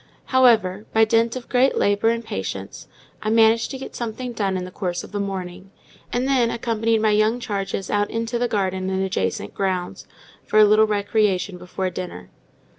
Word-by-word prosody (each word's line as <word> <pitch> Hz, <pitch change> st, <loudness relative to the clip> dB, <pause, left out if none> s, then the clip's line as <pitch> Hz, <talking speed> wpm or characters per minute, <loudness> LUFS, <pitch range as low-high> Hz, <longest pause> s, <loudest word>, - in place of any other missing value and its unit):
However, 220 Hz, -6 st, +4 dB
by 225 Hz, 0 st, +5 dB
dint 230 Hz, +1 st, +2 dB
of 255 Hz, -2 st, -7 dB
great 255 Hz, +2 st, +2 dB
labour 205 Hz, +2 st, +2 dB
and 230 Hz, 0 st, -1 dB
patience, 95 Hz, -, -6 dB, 0.3 s
I 215 Hz, -, -2 dB
managed 225 Hz, 0 st, +4 dB
to 265 Hz, -, -5 dB
get 265 Hz, -, -9 dB
something 240 Hz, +1 st, -4 dB
done 195 Hz, -4 st, -1 dB
in 180 Hz, -, -4 dB
the 185 Hz, -, -9 dB
course 180 Hz, -2 st, -3 dB
of -, -, -11 dB
the 205 Hz, -, -3 dB
morning, 190 Hz, -1 st, -5 dB, 0.4 s
and 250 Hz, +2 st, 0 dB
then 255 Hz, -4 st, +3 dB
accompanied 230 Hz, -1 st, 0 dB
my 215 Hz, -, +4 dB
young 215 Hz, +3 st, +2 dB
charge 200 Hz, -4 st, -3 dB
out 205 Hz, 0 st, 0 dB
into 230 Hz, +1 st, -2 dB
the 245 Hz, -, +1 dB
garden 190 Hz, -3 st, -1 dB
and 190 Hz, 0 st, 0 dB
adjacent 100 Hz, -, -2 dB
grounds, 185 Hz, -2 st, -3 dB, 0.4 s
for -, -, -1 dB
a 215 Hz, -, +8 dB
little 215 Hz, +1 st, +5 dB
recreation 205 Hz, -3 st, 0 dB
before 185 Hz, +1 st, -4 dB
dinner. 175 Hz, -, -7 dB
210 Hz, 185 wpm, -22 LUFS, 190-230 Hz, 0.4 s, a